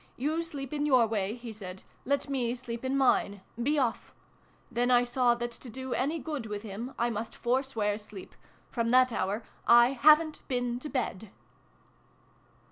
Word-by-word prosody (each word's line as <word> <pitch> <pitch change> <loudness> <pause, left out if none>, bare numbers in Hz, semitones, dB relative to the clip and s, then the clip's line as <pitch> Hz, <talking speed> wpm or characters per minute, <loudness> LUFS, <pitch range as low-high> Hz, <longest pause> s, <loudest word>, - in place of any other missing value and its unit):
' - - -35
You 320 +2 0
sleep 285 -5 -6
in 295 0 0
your 255 -5 +5
way,' 210 -1 -1
he 235 -2 -8
said: 190 -3 -9
' - - -34
let 280 +1 0
me 250 -4 -1
sleep 240 -1 -7
in 265 +1 0
mine. 205 -7 +2 0.2
Be 290 +5 +1
off! 245 -5 -1 0.3
' - - -34
Then 245 +1 +1
I 245 -1 +5
saw 245 0 +2
that 240 0 -4
to 240 +2 -10
do 260 +2 -5
any 290 +6 0
good 285 -5 -5
with 210 0 -5
him, 225 +5 -6
I 235 +1 +1
must 220 +1 -5
forswear 240 -5 0
sleep. 210 -3 -11 0.4
From 230 -2 -1
that 255 +1 +5
hour 205 +2 -1 0.2
I 240 +1 +7
haven 305 +4 +5
t - - -15
been 245 -2 -1
to 300 - -6
bed 220 -7 -3
245 Hz, 190 wpm, -29 LUFS, 225-270 Hz, 0.4 s, I